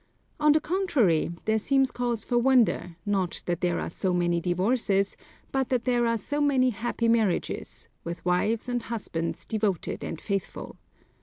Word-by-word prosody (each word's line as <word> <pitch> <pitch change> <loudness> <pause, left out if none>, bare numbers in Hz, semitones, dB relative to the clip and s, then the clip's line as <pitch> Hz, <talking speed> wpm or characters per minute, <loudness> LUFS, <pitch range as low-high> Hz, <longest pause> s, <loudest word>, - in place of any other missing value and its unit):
On 300 0 +5
the 305 - +4
contrary, 300 - +1 0.2
there 220 0 +2
seems 270 +3 +2
cause 240 -2 -1
for 240 - +1
wonder, 240 -8 +3
not 195 -4 -1
that 175 -1 -2
there 175 -1 +1
are - - -4
so 185 +1 -1
many 175 -1 +1
divorces, 195 +2 +1 0.4
but 265 -1 0
that 250 -2 0
there 240 -2 +2
are 230 0 +1
so 290 +8 -2
many 265 -3 +3
happy 230 +1 -2
marriages, 225 -5 0 0.2
with 170 +1 -6
wives 210 +7 +1
and 245 -1 -1
husbands 195 -8 -4
devoted 210 -5 -2
and 160 - -5
faithful. 195 -3 -4
225 Hz, 160 wpm, -27 LUFS, 180-250 Hz, 0.4 s, On